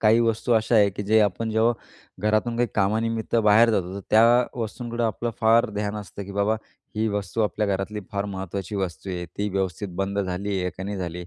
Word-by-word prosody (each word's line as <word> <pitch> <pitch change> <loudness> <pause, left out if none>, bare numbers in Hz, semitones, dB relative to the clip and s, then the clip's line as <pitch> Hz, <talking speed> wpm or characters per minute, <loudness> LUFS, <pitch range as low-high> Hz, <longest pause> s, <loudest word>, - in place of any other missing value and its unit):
काही 110 +2 +5
वस्तू 115 +1 +1
अशा 110 +1 +2
आहे, 105 -2 +6
की 100 - -5
जे 110 +2 +4
आपण 105 +2 0
जेव्हा 110 +2 +3 0.5
घरातून 110 +2 +1
काही 120 0 +1
कामानिमित्त 110 +3 0
बाहेर 110 +1 +5
जातो, 95 -3 -1
तर 100 - -5
त्या 110 +1 +6 0.4
वस्तूंककडं 115 +1 -3
आपलं 115 +1 -1
फार 115 +1 +4
ध्यान 105 0 -3
असतं, 100 -1 -7
की 100 - -9
बाबा 100 +2 +1 0.4
ही 110 - +1
वस्तू 105 +1 -2
आपल्या 105 0 0
घरातली 100 +2 -2
फार 100 0 -1
महत्त्वाची 95 +1 -5
वस्तू 95 0 -4
आहे. 90 -1 -4
ती 100 +5 -3
व्यवस्थित 95 0 -2
बंद 100 +1 -2
झाली 95 +1 -2
आहे 90 - -1
का, - - -23
का - - -4
नाही 100 +1 -4
झाली 90 -2 -4
आहे? 90 - -7
105 Hz, 215 wpm, -24 LUFS, 95-110 Hz, 0.5 s, आहे